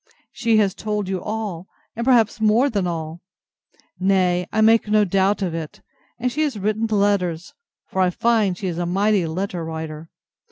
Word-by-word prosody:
She 230 Hz, -2 st, +1 dB
has 200 Hz, -3 st, +2 dB
told 210 Hz, -2 st, -3 dB
you 190 Hz, -1 st, -2 dB
all, 210 Hz, -5 st, -4 dB, 0.3 s
and 235 Hz, -, -3 dB
perhaps 235 Hz, -3 st, +3 dB
more 225 Hz, +6 st, +3 dB
than 200 Hz, -5 st, 0 dB
all; 165 Hz, 0 st, -5 dB, 0.8 s
nay, 185 Hz, -2 st, +2 dB
I 220 Hz, -, -1 dB
make 220 Hz, 0 st, +4 dB
no 210 Hz, 0 st, +3 dB
doubt 195 Hz, +2 st, +1 dB
of 175 Hz, -3 st, -2 dB
it; 160 Hz, -2 st, -6 dB, 0.4 s
and 245 Hz, +1 st, -1 dB
she 300 Hz, -, -2 dB
has 290 Hz, -7 st, 0 dB
written 215 Hz, +3 st, -1 dB
letters 200 Hz, -5 st, 0 dB, 0.3 s
(for 190 Hz, -, -2 dB
I 185 Hz, -, +4 dB
find 210 Hz, -1 st, +1 dB
she 195 Hz, -, -6 dB
is 175 Hz, -2 st, -3 dB
a 175 Hz, -, -1 dB
mighty 195 Hz, 0 st, +1 dB
letter 180 Hz, +1 st, -3 dB
writer!) 160 Hz, 0 st, -6 dB
195 Hz, 175 wpm, -21 LUFS, 175-220 Hz, 0.8 s, make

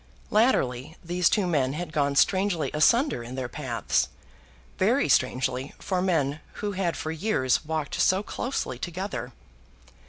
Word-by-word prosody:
Latterly 155 Hz, -, +2 dB
these 175 Hz, +1 st, +2 dB
two 205 Hz, -3 st, +2 dB
men 140 Hz, -7 st, +1 dB
had 170 Hz, +1 st, -5 dB
gone 140 Hz, -2 st, +1 dB
strangely 185 Hz, -3 st, +2 dB
asunder 235 Hz, -, +3 dB
in 120 Hz, +2 st, -7 dB
their 130 Hz, -2 st, -3 dB
paths, -, -, -1 dB, 0.7 s
very -, -, +3 dB
strangely 130 Hz, +1 st, +1 dB
for 185 Hz, -2 st, -2 dB
men 155 Hz, -6 st, +1 dB
who 205 Hz, -, -3 dB
had 185 Hz, -3 st, -1 dB
for 155 Hz, -, -3 dB
years 160 Hz, -, +1 dB
walked 155 Hz, -2 st, -2 dB
so 190 Hz, +2 st, +3 dB
closely 210 Hz, -, -3 dB
together. 185 Hz, +6 st, -4 dB
160 Hz, 135 wpm, -26 LUFS, 135-190 Hz, 0.7 s, asunder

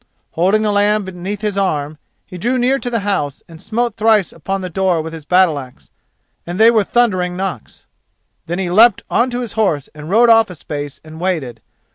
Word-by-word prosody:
Holding 195 Hz, +6 st, +2 dB
the 210 Hz, -, +1 dB
lamb 205 Hz, 0 st, +2 dB
beneath 190 Hz, +2 st, -6 dB
his 210 Hz, -2 st, -1 dB
arm, 150 Hz, -5 st, -2 dB, 0.3 s
he 180 Hz, -2 st, -10 dB
drew 245 Hz, +7 st, 0 dB
near 255 Hz, +2 st, +2 dB
to 245 Hz, -, -4 dB
the 230 Hz, -3 st, -1 dB
house 170 Hz, -9 st, -2 dB
and 165 Hz, -1 st, -13 dB
smote 230 Hz, 0 st, -2 dB
thrice 215 Hz, -3 st, +2 dB
on 195 Hz, 0 st, -1 dB
the 185 Hz, -, -4 dB
door 185 Hz, -1 st, +1 dB
with 160 Hz, +1 st, -5 dB
his 160 Hz, -3 st, -9 dB
battle 180 Hz, -3 st, +3 dB
axe, 130 Hz, -2 st, -13 dB, 0.5 s
and 175 Hz, +3 st, -6 dB
they 225 Hz, +1 st, +7 dB
were 220 Hz, -3 st, +3 dB
thundering 185 Hz, -6 st, 0 dB
knocks. 185 Hz, -, -6 dB, 0.6 s
Then 175 Hz, +2 st, -2 dB
he 185 Hz, -2 st, -2 dB
leapt 220 Hz, +3 st, +5 dB
on 245 Hz, +2 st, +2 dB
to 245 Hz, 0 st, -3 dB
his 235 Hz, -4 st, -6 dB
horse 190 Hz, -10 st, 0 dB
and 150 Hz, +1 st, -10 dB
rode 230 Hz, +4 st, +5 dB
off 225 Hz, -2 st, +5 dB
a 180 Hz, -, -8 dB
space 145 Hz, -2 st, -6 dB
and 160 Hz, 0 st, -11 dB
waited. 145 Hz, -11 st, -2 dB
190 Hz, 205 wpm, -17 LUFS, 165-220 Hz, 0.6 s, they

